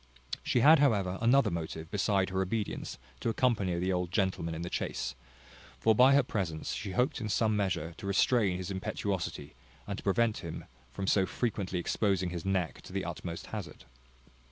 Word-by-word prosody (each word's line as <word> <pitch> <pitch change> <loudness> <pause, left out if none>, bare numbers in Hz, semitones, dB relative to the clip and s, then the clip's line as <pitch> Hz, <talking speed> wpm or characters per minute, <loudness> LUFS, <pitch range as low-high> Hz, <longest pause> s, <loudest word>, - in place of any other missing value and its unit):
She 120 - +1
had 155 +4 +8
however 100 -9 +2
another 120 -2 +4
motive, 80 -1 -5
beside 100 -2 +1
her 95 0 0
obedience, 105 +2 -3 0.2
to - - -1
accompany 110 -7 +1
the 90 +2 0
old 90 -1 -1
gentleman 95 -5 0
in 80 - -4
the 85 - -4
chase; 65 +1 -2 0.7
for 110 - +4
by 130 +5 +6
her 140 - +5
presence 90 -10 -3
she 100 -3 -4
hoped 125 - +1
in 110 - -3
some 110 0 +2
measure 95 -4 -1
to 100 - -7
restrain 100 -1 +3
his 95 +1 -5
impetuosity, 95 -5 -3 0.3
and 100 -1 -4
to - - -11
prevent 105 +3 +2
him 85 -1 -7 0.2
from 95 +9 -5
so 95 -1 +3
frequently 100 -6 -2
exposing 95 0 0
his 85 -2 -4
neck 95 -4 -1
to - - -12
the - - -2
utmost - - -5
hazard. - - -6
95 Hz, 180 wpm, -31 LUFS, 90-110 Hz, 0.7 s, had